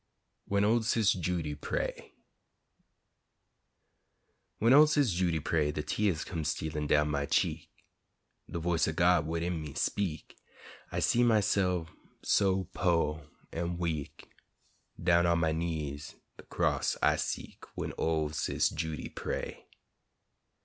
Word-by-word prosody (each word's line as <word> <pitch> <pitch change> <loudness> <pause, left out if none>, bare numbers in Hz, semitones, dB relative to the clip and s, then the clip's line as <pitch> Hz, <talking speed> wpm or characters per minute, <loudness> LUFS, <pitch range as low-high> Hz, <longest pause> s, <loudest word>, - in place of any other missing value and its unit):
WHEN 100 0 +1
OL' 115 +3 +3
SIS' 110 -1 +2
JUDY 85 -4 -2
PRAY 75 - -4 2.4
When 115 +3 +4
ol' 150 +2 +8
Sis' 145 -6 +2
Judy 85 -2 +1
pray, 75 0 0
De 75 0 -4
teahs 90 +1 0
come 85 -5 -4
stealin' 75 0 -2
down 75 0 +3
my 70 -1 -1
cheek, - - 0 0.8
De - - -4
voice 85 0 +1
ur 80 - -1
God 85 -1 +3
widin 85 0 -2
me 75 -3 -8
speak'; 90 -7 -2 0.6
I - - -2
see 120 - +3
myse'f 100 -7 +2 0.3
so 95 -1 +2
po' 80 -3 0 0.2
an' 85 +1 -3
weak, 80 -3 -4 0.7
Down 85 0 +3
on 85 0 +3
my 80 -1 +1
knees 80 -3 -4 0.2
de - - -13
cross - - 0
I - - +5
seek, - - -4
When - - -4
ol' 80 -2 +1
Sis' 75 -4 0
Judy 80 -1 -4
pray. - - -5
85 Hz, 130 wpm, -30 LUFS, 75-95 Hz, 2.4 s, ol